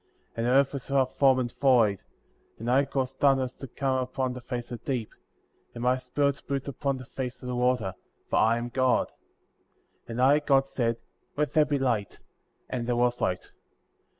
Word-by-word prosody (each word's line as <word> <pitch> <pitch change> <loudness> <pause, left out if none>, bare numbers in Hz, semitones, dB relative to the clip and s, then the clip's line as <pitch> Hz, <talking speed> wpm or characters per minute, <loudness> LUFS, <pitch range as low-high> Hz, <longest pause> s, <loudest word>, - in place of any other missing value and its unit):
And 115 +1 -1
the - - +2
earth 135 +2 +4
was 140 -1 -6
without 135 -2 +1
form, 135 -2 +5
and 120 -2 -1
void; 115 -8 +4 0.6
and 115 +2 -2
I 135 +2 +4
caused 130 -1 -3
darkness 135 -3 +3
to 135 - -7
come 130 +1 -1
up 125 - -4
upon 130 -1 -1
the 125 - -8
face 120 -1 -5
of 120 - -5
the - - -3
deep; 115 -4 -4 0.6
and 120 - -5
my 125 +1 +3
Spirit 140 +2 -1
moved 140 0 -2
upon 140 0 -2
the 130 - -9
face 125 -1 -6
of - - -6
the 125 - -2
water; 125 -6 +1 0.3
for - - 0
I 115 +2 +4
am 120 +1 -4
God. 130 0 +2 1.0
3. 115 - -6
And 120 - -1
I, 140 +3 +6
God, 135 -2 +3
said: 120 -4 -1 0.4
Let 150 0 0
there 155 -2 +5
be 145 -1 0
light; 120 -7 -1 0.5
and 120 -2 -3
there 120 - +1
was 120 0 +1
light. 90 0 -1
130 Hz, 205 wpm, -27 LUFS, 120-135 Hz, 1.0 s, I